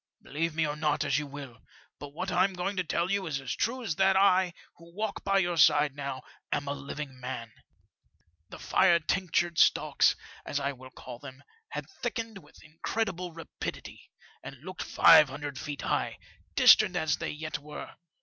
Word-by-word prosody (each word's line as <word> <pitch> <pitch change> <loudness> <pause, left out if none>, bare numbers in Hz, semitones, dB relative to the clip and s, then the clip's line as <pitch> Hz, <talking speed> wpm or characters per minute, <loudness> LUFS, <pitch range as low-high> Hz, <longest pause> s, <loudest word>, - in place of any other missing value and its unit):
" - - -56
Believe 160 +2 -2
me 160 -1 +2
or 150 -1 -2
not 150 -1 0
as 145 0 +2
you 150 - -5
will, 140 -4 -9 0.4
but 145 - -8
what 180 +6 -4
I'm 185 +2 +2
going 185 +3 -3
to 185 - +1
tell 170 +2 -1
you 200 -2 0
is 140 -4 -2
as 135 - -4
true 250 +2 -1
as 165 -9 -3
that 190 0 +4
I, 190 -2 +4 0.3
who 170 0 -16
walk 215 0 -3
by 195 0 +2
your 175 -3 +1
side 145 -2 +5
now, 140 -2 -5 0.3
am 145 - -1
a 140 - -1
living 140 -1 -7
man. 125 -3 -6 1.0
The - - -9
fire 175 -3 +4
tinctured 175 -1 0
stalks, - - +4 0.3
as 145 - -2
I 140 0 -1
will 130 -1 -12
call 125 -2 -10
them, 135 0 -11 0.3
had - - -5 0.2
thickened 230 -3 -3
with - - -19
incredible 180 +3 -3
rapidity, 165 0 -8 0.3
and - - -8
looked - - -7
five 155 -3 +7
hundred 140 0 -6
feet 145 -1 -6
high, - - -1 0.4
distant - - +7
as 155 -2 +1
they - - -4
yet 155 0 -5
were. 150 +1 -9
155 Hz, 185 wpm, -29 LUFS, 140-185 Hz, 1.0 s, five